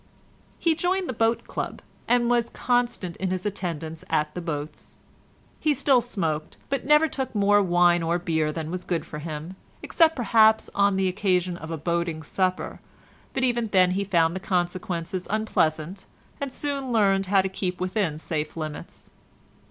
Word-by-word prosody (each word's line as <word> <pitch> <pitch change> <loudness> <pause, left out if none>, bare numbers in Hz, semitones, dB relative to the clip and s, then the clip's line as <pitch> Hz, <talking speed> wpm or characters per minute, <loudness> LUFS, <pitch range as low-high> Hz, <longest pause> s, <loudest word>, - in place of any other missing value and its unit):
He 330 - +2
joined 365 +3 0
the - - -2
boat 230 +1 +1
club, - - -4 0.3
and 245 -1 +3
was 240 -1 +2
constant 240 -8 -1
in 190 - -2
his 185 +1 -3
attendance 165 -5 -4
at 150 0 0
the 180 - -5
boats. 150 -3 -6 0.6
He 305 -2 +2
still 260 -1 +4
smoked, 165 -10 -3
but 275 -1 -1
never 300 +2 +6
took 265 -5 -4
more 205 0 +4
wine 175 -2 +4
or 165 +1 +1
beer 160 -4 0
than 160 0 -5
was 180 0 -4
good 170 -3 -2
for 150 - -7
him, 155 +3 -6 0.3
except 325 -1 +3
perhaps 220 -2 +4
on 200 0 +3
the 190 0 +1
occasion 185 -2 0
of 160 -2 -8
a 165 - -3
boating 170 0 -2
supper, 185 +4 -2 0.5
but 260 - 0
even 240 -2 +1
then 185 -3 +4
he 195 +2 0
found 170 -3 +2
the - - -2
consequences 180 -1 -2
unpleasant, 185 -4 -1 0.3
and 280 -1 -3
soon 275 -1 -3
learned 195 -4 +3
how 195 0 +4
to - - 0
keep 185 -1 -3
within 185 -4 -1
safe 155 0 -4
limits. 155 -2 -7
185 Hz, 165 wpm, -25 LUFS, 165-225 Hz, 0.6 s, never